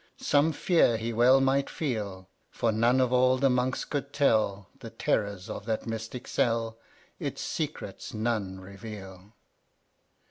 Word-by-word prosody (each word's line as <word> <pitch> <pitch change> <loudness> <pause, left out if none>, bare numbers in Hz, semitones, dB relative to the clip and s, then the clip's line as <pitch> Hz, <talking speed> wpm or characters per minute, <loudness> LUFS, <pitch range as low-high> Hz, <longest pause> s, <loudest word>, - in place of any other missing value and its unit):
Some 145 +3 +3
fear 160 -6 +3
he 115 +1 -3
well 125 +4 +6
might 135 +1 +2
feel, 105 - -3 0.2
For 115 - 0
none 120 +4 +3
of 130 -1 +2
all 130 +1 +4
the 135 0 +3
Monks 125 +1 0
could 140 -1 -3
tell 105 -9 +2
The 115 -4 -8
terrors 100 -4 -1
of 105 - -7
that 110 -1 -1
mystic 115 +2 -5
cell, 115 -1 0 0.4
Its - - -4
secrets - - -4
none 110 -4 -2
reveal. 95 0 -10
115 Hz, 140 wpm, -28 LUFS, 105-130 Hz, 0.4 s, well